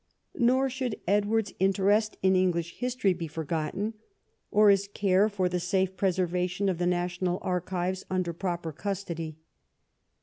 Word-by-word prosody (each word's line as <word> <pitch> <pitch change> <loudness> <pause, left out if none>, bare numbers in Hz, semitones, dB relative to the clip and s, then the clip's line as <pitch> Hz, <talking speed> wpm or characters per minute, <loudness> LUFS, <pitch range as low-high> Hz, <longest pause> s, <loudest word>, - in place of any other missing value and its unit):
Nor 260 +2 +4
should 255 -3 -3
Edward's 210 +2 +1
interest 200 +3 +2
in 190 0 +4
English 175 -2 0
history 250 -6 +1
be 170 -2 -5
forgotten, 160 +7 -3 0.6
or 210 0 +6
his 200 0 +2
care 200 0 +2
for 190 -3 0
the 180 0 -1
safe 190 +1 0
preservation 180 0 0
of 180 -3 -2
the 175 - +1
national 180 0 0
archives 180 +1 -2
under 185 -2 -1
proper 175 -2 -3
custody. 170 -3 -4
185 Hz, 135 wpm, -28 LUFS, 175-205 Hz, 0.6 s, or